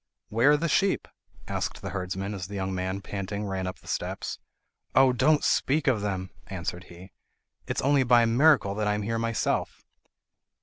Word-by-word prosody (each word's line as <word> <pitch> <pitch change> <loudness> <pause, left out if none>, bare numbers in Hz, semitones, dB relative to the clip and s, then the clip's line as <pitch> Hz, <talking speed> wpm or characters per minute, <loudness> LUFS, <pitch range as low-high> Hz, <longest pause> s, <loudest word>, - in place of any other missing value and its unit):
"Where 115 +6 +4
are - - +4
the 165 +3 -1
sheep?" 195 +5 +1 0.4
asked - - -3
the - - -4
herdsman 95 +1 -3
as 95 -2 -5
the 100 - -8
young 95 -1 -2
man 95 +1 -2
ran 100 - -6
panting 100 -1 -4
up 90 - -5
the - - -20
steps. - - -3 0.6
"Oh! 130 -1 +6
don't 150 +4 +3
speak 145 +2 +2
of 125 -6 +2
them," 95 -3 -3 0.2
answered 90 -1 -5
he. 90 +2 -13 0.6
"It - - -3
is - - +1
only 140 0 +4
by 120 -2 +5
a - - +3
miracle 120 -3 +4
that 105 0 -1
I 105 - +2
am 105 - -3
here 115 +2 -1
myself." 115 -2 -1
105 Hz, 190 wpm, -27 LUFS, 95-125 Hz, 0.6 s, Oh